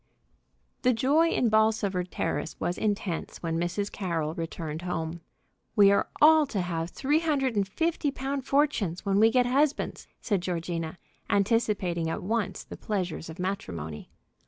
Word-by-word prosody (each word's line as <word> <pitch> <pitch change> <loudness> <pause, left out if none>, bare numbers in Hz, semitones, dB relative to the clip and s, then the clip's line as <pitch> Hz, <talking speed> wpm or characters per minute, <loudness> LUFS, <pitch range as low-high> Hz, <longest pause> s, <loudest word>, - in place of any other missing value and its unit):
The 250 0 +4
joy 290 +8 +3
in 245 - +2
Bolsover 215 -4 +2
Terrace 175 -2 -3
was 175 - -2
intense 205 -5 -2
when 165 -1 -1
Mrs. 175 +4 -2
Carroll 165 -5 -2
returned 165 -1 -5
home. 170 -2 -3 0.5
"We 200 -1 +7
are 200 - +2
all 310 0 +7
to 210 - -2
have 170 -2 -2
three 290 - +1
hundred 280 -7 0
and 200 -2 +1
fifty 320 - 0
pound 270 0 -4
fortunes 255 - +1
when 200 0 +2
we 220 +1 +7
get 250 +1 +3
husbands!" 275 +4 0
said 200 -6 0
Georgina, 170 -2 -3 0.3
anticipating 200 -5 +1
at - - -3
once 220 +1 -1
the - - -10
pleasures 180 -6 -3
of 160 - -8
matrimony. 85 - -4
200 Hz, 150 wpm, -28 LUFS, 170-250 Hz, 0.5 s, We